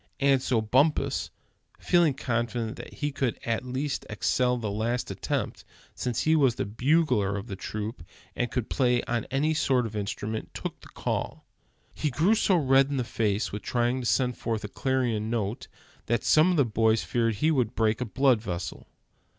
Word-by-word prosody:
And 140 -1 +4
so 120 -3 +1
Bumpus, 140 +4 +1 0.5
feeling 170 -6 +3
confident 120 -2 -2
that - - -9
he 145 -1 -3
could 135 -4 -1
at 115 +1 -1
least 130 +3 -3
excel 125 +3 +1
the 110 -4 -3
last 115 +4 -1
attempt, - - -3 0.3
since 125 -2 -2
he 160 +1 +3
was 135 -6 +3
the - - -2
bugler 120 - +1
of 100 - -5
the 100 -5 -6
troop, 105 +1 -5 0.3
and 120 - -1
could 125 -3 -2
play 125 -2 +2
on 120 -2 -2
any 145 +5 +1
sort 130 -5 +2
of 110 -1 -6
instrument, 105 +1 -4
took - - -5
the - - -14
call. - - -3 0.5
He 150 - -1
grew 160 - +3
so 210 -3 +3
red 135 -3 +4
in 140 - -2
the 125 - +1
face 110 -2 -1
with 105 - -5
trying 120 +1 0
to 120 - -2
send 125 -1 +1
forth 115 -1 -2
a - - -3
clarion 120 -5 -1
note, 115 -1 -2 0.4
that 120 -1 +1
some 155 +4 +5
of 180 - +1
the 140 - +4
boys 110 0 +2
feared 115 -2 0
he 155 +10 +2
would 125 -6 0
break 110 +1 +1
a - - 0
blood 130 0 +2
vessel. 90 -5 -5
120 Hz, 185 wpm, -27 LUFS, 110-135 Hz, 0.5 s, some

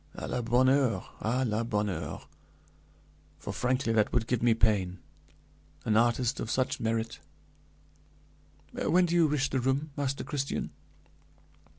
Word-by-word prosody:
"À - - -5
la 125 - -1
bonne 120 +3 +3
heure! 130 -3 +2
à 125 +4 0
la 110 +1 0
bonne 105 -2 0
heure! 80 -6 -4 1.1
For - - -6
frankly 125 -1 0
that 105 -2 +2
would 120 -2 +1
give 120 0 -1
me 120 -1 +4
pain; 100 -5 +1 0.9
an 110 - +2
artist 120 +1 +2
of 110 - -4
such 130 +1 0
merit! 115 0 -2 1.5
When 180 +1 +3
do 170 - -2
you 170 -2 +5
wish 145 -2 0
the 130 - +1
room, 135 +4 0
Master 140 -2 -2
Christian?" 140 -1 -3
120 Hz, 145 wpm, -29 LUFS, 110-135 Hz, 1.5 s, you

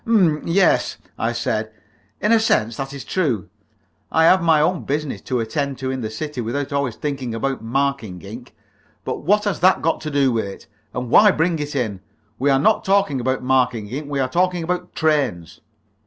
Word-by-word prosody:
"'M, 180 -10 +3
yes," 185 +4 +2 0.2
I - - 0
said. - - -2 0.5
"In 210 - +2
a 230 - +6
sense 115 - +1
that 135 0 -4
is 140 -1 -8
true. 135 - -1 0.6
I 160 - +3
have 185 +2 +6
my 165 -2 +4
own 175 +3 +1
business 145 0 -3
to 125 -2 -2
attend 135 +4 -2
to 130 0 -3
in 130 -1 -3
the 110 - -3
city 130 +4 -5
without 135 +5 -3
always 140 -5 -1
thinking 135 -5 -4
about 135 +2 -2
marking 120 -5 -1
ink. 115 +5 -10 0.5
But - - -2
what 210 +6 +2
has 200 -6 -1
that 185 +2 +4
got 165 - +1
to 155 - -4
do 140 -3 +2
with 115 -3 0
it? 100 - -9 0.3
And 125 -1 -5
why 210 - +7
bring 165 -2 +1
it 145 0 -4
in? 110 -8 -2 0.4
We 140 +3 +2
are 135 - +4
not 215 +11 +3
talking 195 -9 +2
about 130 +1 -1
marking 125 -5 +1
ink; 140 +5 -5
we 140 -1 -2
are 130 - +1
talking 180 +4 0
about 180 +1 -3
trains!" 135 - 0
140 Hz, 200 wpm, -21 LUFS, 125-165 Hz, 0.6 s, why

